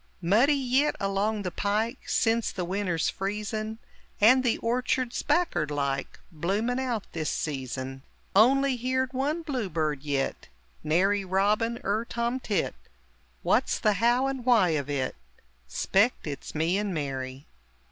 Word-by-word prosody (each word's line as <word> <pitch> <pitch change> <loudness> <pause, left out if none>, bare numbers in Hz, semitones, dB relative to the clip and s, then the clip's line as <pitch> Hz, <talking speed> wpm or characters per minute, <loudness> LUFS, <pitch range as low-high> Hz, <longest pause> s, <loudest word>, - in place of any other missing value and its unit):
Muddy 220 - +4
yit 270 +2 +2
along 200 +2 0
the 180 - -3
pike 210 +6 -1
Sense 230 0 +2
the 180 -3 -3
winter's 180 -3 -1
freezin' 215 +2 -3 0.4
And 255 +5 +6
the 245 - +2
orchard's 250 +1 0
backard 175 - +1
like 140 -2 -2
Bloomin' 205 +10 -1
out 245 -5 -2
this 155 -2 -2
season; 135 -2 -4 0.3
Only 265 +5 +5
heerd 260 +2 -1
one 295 +6 -1
bluebird 165 - -2
yit 140 -2 -2 0.3
Nary 195 +6 +2
robin 210 +5 +1
er 215 +4 0
tomtit; 235 -5 -1 0.7
What's - - +2
the 210 - +2
how 240 +5 +3
and 270 -2 -2
why 230 -7 +4
of 145 -3 -1
it? 135 -3 -1 0.5
S'pect 200 - +1
its 145 -1 -6
"Me 165 +5 +1
and 205 -3 -2
Mary!" 135 -2 -4
205 Hz, 130 wpm, -27 LUFS, 160-245 Hz, 0.7 s, And